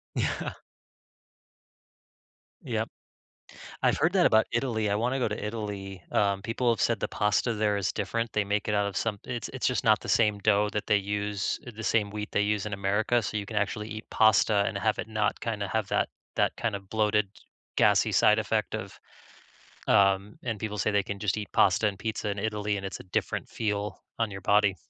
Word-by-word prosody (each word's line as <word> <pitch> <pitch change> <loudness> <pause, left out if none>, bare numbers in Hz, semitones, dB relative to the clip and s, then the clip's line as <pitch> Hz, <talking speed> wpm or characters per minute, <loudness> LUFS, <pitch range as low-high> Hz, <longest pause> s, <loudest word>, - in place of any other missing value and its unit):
Yeah. - - -1 2.1
Yep. - - -2 0.9
I've - - +3
heard 165 - +2
that 180 -3 +5
about 110 0 +4
Italy. 115 -4 0
I 100 - +2
wanna 125 +5 0
go 125 - +1
to 105 - -4
Italy. 100 -4 -5
Um, 100 -1 +1
people 120 +2 0
have 115 - -3
said 115 -2 +2
the - - -1
pasta 105 +3 +1
there 105 -1 +1
is 100 -3 -1
different. 115 +3 -2
They 105 - +2
make 100 +1 -1
it 105 - +1
out 100 -1 +2
of 100 - -4
some 110 -3 -1
it 120 -3 -4
it's - - -1
just - - 0
not - - +5
the - - -9
same 105 -2 +3
dough 105 0 +3
that 105 - -2
they 105 - +5
use 100 0 -2
eh, - - -6
the 110 +1 -7
same 105 -2 +1
wheat 105 0 -5
they - - +2
use 105 0 0
in 105 - -5
America, 105 +4 +1
so 105 - -3
you 100 -1 -3
can 110 0 -6
actually 105 +1 -1
eat 110 0 -7
pasta 105 -1 +4
and 105 - -3
have 110 +1 +1
it - - -3
not 110 -1 0
kinda 105 -4 -3
have 110 -1 -1
that - - +1 0.3
that - - +1
kind 115 -3 -1
of 100 -1 -7
bloated, 105 -1 +2 0.5
gassy - - +4
side - - +5
effect - - -1
of - - -6 0.9
um, 100 +1 +3
and 115 -3 -3
people 105 0 -4
say 110 - +1
they 100 -1 +2
can 100 +1 -5
just 100 0 0
eat 105 -1 -4
pasta 100 +3 +4
and 100 -2 -1
pizza 110 0 -3
in 100 - -4
Italy, 105 0 -1
and 100 -1 -4
it's 95 - -6
a - - -7
different 90 - -2
feel 105 -1 -2 0.2
on 115 -2 0
your 95 -1 -7
body. 100 0 +3
105 Hz, 210 wpm, -28 LUFS, 100-110 Hz, 2.1 s, that